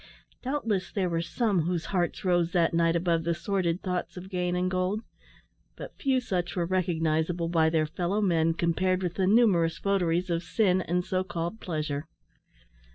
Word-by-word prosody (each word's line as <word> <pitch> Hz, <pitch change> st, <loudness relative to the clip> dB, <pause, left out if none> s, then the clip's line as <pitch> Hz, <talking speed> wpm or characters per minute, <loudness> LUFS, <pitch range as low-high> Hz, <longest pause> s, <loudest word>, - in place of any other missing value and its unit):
Doubtless 230 Hz, -8 st, -2 dB
there 185 Hz, -3 st, -1 dB
were 165 Hz, 0 st, 0 dB
some 200 Hz, +1 st, 0 dB
whose 170 Hz, +1 st, -2 dB
hearts 175 Hz, 0 st, -1 dB
rose 175 Hz, -2 st, +2 dB
that 170 Hz, -3 st, +2 dB
night 165 Hz, 0 st, +3 dB
above 170 Hz, -1 st, +1 dB
the 170 Hz, +1 st, 0 dB
sordid 175 Hz, 0 st, -1 dB
thoughts 180 Hz, -1 st, -3 dB
of 185 Hz, +2 st, -9 dB
gain 180 Hz, -1 st, -1 dB
and 180 Hz, +1 st, 0 dB
gold; 185 Hz, +3 st, 0 dB, 0.7 s
but -, -, -9 dB
few 265 Hz, -2 st, +1 dB
such 180 Hz, -7 st, -2 dB
were 175 Hz, -2 st, 0 dB
recognisable 165 Hz, -2 st, 0 dB
by 160 Hz, -2 st, +3 dB
their 160 Hz, -1 st, +2 dB
fellow 175 Hz, +6 st, -1 dB
men, 165 Hz, -5 st, +2 dB
compared 185 Hz, +2 st, +1 dB
with 175 Hz, -1 st, -1 dB
the 190 Hz, 0 st, 0 dB
numerous 185 Hz, -7 st, +4 dB
votaries 180 Hz, -2 st, 0 dB
of 165 Hz, 0 st, 0 dB
sin 185 Hz, 0 st, +2 dB
and 180 Hz, +1 st, -1 dB
so 185 Hz, 0 st, 0 dB
called 175 Hz, +3 st, -4 dB
pleasure. 155 Hz, -4 st, -3 dB
175 Hz, 170 wpm, -28 LUFS, 165-185 Hz, 0.7 s, numerous